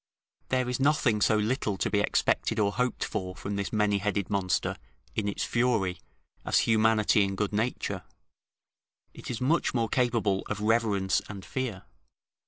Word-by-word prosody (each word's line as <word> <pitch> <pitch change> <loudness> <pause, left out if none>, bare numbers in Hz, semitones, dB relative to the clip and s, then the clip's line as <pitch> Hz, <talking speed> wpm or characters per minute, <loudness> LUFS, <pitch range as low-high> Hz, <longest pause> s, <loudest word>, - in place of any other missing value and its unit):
There 130 -1 +1
is 125 +1 -2
nothing 135 -6 +2
so 110 - +4
little 105 -2 0
to - - 0
be 105 - +2
expected 115 +2 +1
or 100 -2 +2
hoped 125 +3 -1
for 95 -4 -4
from 100 +2 -5
this 100 -1 -3
many 105 -2 +2
headed 100 -1 -2
monster, 95 -3 0 0.4
in 105 -2 -1
its 100 - -2
fury, 115 -8 +1 0.4
as - - +3
humanity 110 -2 +3
and 95 -1 -2
good 105 0 -1
nature; 115 +4 -1 1.1
it - - -9
is 120 - -3
much 140 +2 +1
more 115 -2 +1
capable 115 -6 +1
of 105 - -2
reverence 105 -3 +2
and 100 -3 -8
fear. 125 -8 -4
105 Hz, 160 wpm, -28 LUFS, 100-120 Hz, 1.1 s, so